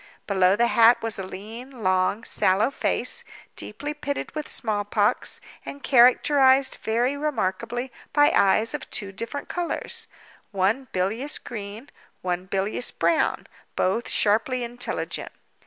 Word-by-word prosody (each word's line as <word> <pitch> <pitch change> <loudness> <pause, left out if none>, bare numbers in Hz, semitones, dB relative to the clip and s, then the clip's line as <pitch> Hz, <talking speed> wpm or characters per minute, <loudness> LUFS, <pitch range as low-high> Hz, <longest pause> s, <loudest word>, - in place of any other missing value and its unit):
Below 190 -1 +3
the 235 +3 +3
hat 235 0 +5
was 225 -3 -2
a - - -3
lean, 225 +6 -9
long, 185 +3 +1
sallow 200 +7 +2
face, - - -1 0.3
deeply 290 +8 -5
pitted 285 -1 -4
with 305 -1 -4
the - - -9
smallpox, 205 -2 0 0.2
and 280 - -9
characterized, 265 +1 +5
very 240 +5 +1
remarkably, 240 -3 -2 0.2
by 290 0 +5
eyes 215 +5 +3
of 295 - -5
two 200 -3 -3
different 230 +8 -5
colors—one 240 - -3
bilious 220 +11 -2
green, 215 +3 -8 0.3
one 180 0 -2
bilious 195 +5 -1
brown, 325 - +1 0.3
both 210 +6 0
sharply 230 +4 +2
intelligent. 240 +1 -4
230 Hz, 125 wpm, -25 LUFS, 200-265 Hz, 0.3 s, hat